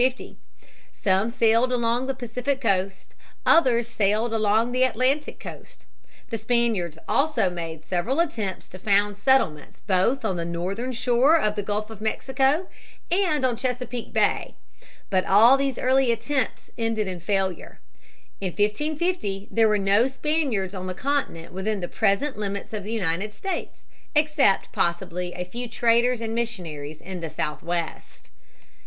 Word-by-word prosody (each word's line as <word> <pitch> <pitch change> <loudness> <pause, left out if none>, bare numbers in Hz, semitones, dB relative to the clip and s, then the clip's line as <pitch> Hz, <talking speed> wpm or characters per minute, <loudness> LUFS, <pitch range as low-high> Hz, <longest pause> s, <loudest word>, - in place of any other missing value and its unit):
Some 195 +3 +1
sailed 230 +1 +3
along 240 +1 +1
the 270 - -1
Pacific 250 +2 -2
coast; 195 -5 -1 0.3
others 240 -8 +4
sailed 220 +1 +1
along 220 +2 +2
the 255 +1 0
Atlantic 260 +4 +1
coast. - - -11 0.5
The 225 - -2
Spaniards 220 -8 0
also 280 -10 +2
made 165 -2 -6
several 215 - -1
attempts 220 - -1
to 185 - -11
found 205 +1 +2
settlements 200 - +1
both 220 +7 +1
on 190 -4 0
the 170 - -2
northern 185 +9 -3
shore 250 +6 +4
of 215 -9 +1
the 205 - -1
Gulf 210 +2 -3
of 215 -2 -10
Mexico 265 +9 +1 0.4
and 340 -7 +2
on 250 -2 +1
Chesapeake 250 -1 -4
Bay. - - +1 0.6
But 185 -1 +3
all 225 +7 +7
these 275 -2 -1
early 260 -1 +3
attempts 235 +2 -2
ended 225 -2 0
in 180 -2 -4
failure. 190 0 -2 0.6
In 185 -3 -3
1550 215 - -1
there 225 -1 +4
were 210 - +3
no 200 +4 +3
Spaniards 265 - -1
on 185 -1 -5
the 185 - -4
continent 265 - -2
within 200 +3 -2
the 175 - -3
present 220 +6 0
limits 200 0 -4
of 210 -2 -3
the 210 - -6
United 200 -1 -1
States, 385 - -5 0.3
except 300 -9 +3
possibly 175 0 -1
a 180 - -4
few 240 +6 -6
traders 235 +1 +2
and 225 -1 -3
missionaries 165 -11 -4
in 185 -2 -7
the 165 - -4
Southwest. 165 +3 -4
220 Hz, 145 wpm, -25 LUFS, 190-255 Hz, 0.6 s, all